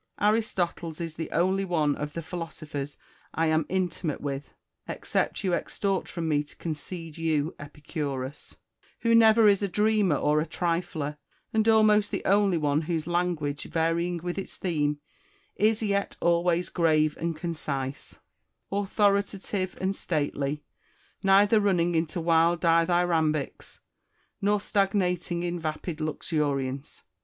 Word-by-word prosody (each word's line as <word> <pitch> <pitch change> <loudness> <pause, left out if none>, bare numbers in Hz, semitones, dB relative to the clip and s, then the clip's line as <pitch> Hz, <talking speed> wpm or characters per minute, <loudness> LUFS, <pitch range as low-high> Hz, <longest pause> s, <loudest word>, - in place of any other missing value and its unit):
Aristoteles 185 -6 0
is 165 -2 -4
the 160 0 -5
only 190 +3 +1
one 155 -6 +1
of 150 0 -5
the 165 - -5
philosophers 155 -4 -6 0.4
I 165 - +2
am 155 -1 +2
intimate 180 -4 -1
with 140 0 -5 0.4
(except - - -2
you 185 -2 +1
extort 195 +2 -1
from 170 -2 -3
me 150 -2 +2
to 150 - -16
concede 165 0 -6
you 160 0 0
Epicurus) 145 -2 -5 0.5
who 230 -1 +3
never 225 -1 +7
is 200 -1 +4
a 200 - +1
dreamer 210 -2 +2
or 150 +2 +2
a 160 - -3
trifler, 165 -4 -2 0.4
and 220 0 +2
almost 215 -2 +5
the - - -4
only 200 -2 +3
one 150 -1 +1
whose 165 -1 -2
language, 170 -4 -1
varying 170 +2 0
witli 175 +2 -3
its 195 - -7
theme, 150 -5 0 0.6
is 220 +1 +2
yet 200 -1 -1
always 170 +1 +2
grave 155 -3 +2
and 165 0 -2
concise, 145 -5 -4 0.5
authoritative 200 -1 0
and 190 +1 0
stately, 145 -2 -2 0.6
neither 200 +3 +5
running 180 -4 +2
into 160 +1 0
wild 165 +1 +3
dithy 170 +1 +3
rambics, 155 -4 -1 0.6
nor 205 +1 +2
stagnating 185 -4 0
in 175 0 -2
vapid 155 +1 -4
luxuriance. 145 -3 -2
170 Hz, 130 wpm, -27 LUFS, 155-195 Hz, 0.6 s, never